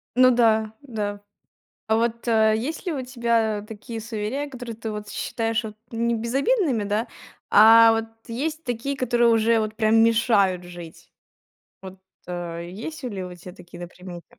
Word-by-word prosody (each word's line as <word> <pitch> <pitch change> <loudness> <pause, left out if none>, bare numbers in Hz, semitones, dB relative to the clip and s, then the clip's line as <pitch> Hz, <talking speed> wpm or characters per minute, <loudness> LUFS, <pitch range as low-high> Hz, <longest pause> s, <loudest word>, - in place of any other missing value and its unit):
Ну 255 0 +6
да, 220 -2 +3
да. 205 -6 -4 0.7
А 220 0 +2
вот, 235 +1 -1
э, 220 -1 +4
есть 310 - -4
ли 345 - 0
у 270 -3 -3
тебя 230 -4 0
такие 225 +1 -7
суеверия, 230 +6 -4
которые 245 -4 -8
ты 225 -1 -5
вот 210 0 -6
считаешь 225 0 -2
вот 215 -1 -7
не 235 0 0
безобидными, 265 - 0
да? 210 +3 -1 0.4
А 225 +1 +8
вот 225 0 -1 0.2
есть 305 +7 -3
такие, 250 +3 -3
которые 240 -2 +2
уже 225 0 +3
вот 215 0 -3
прям 220 0 +3
мешают 215 -6 +2
жить? 175 -2 -12 0.7
Вот, 190 0 -10 0.3
э, 170 -1 -5
есть 265 - -7
ли 200 -7 -4
у 180 0 -8
тебя 180 +1 -12
такие 175 0 -13
на 175 - -6
примете? 180 -1 -12
225 Hz, 165 wpm, -24 LUFS, 205-240 Hz, 0.7 s, А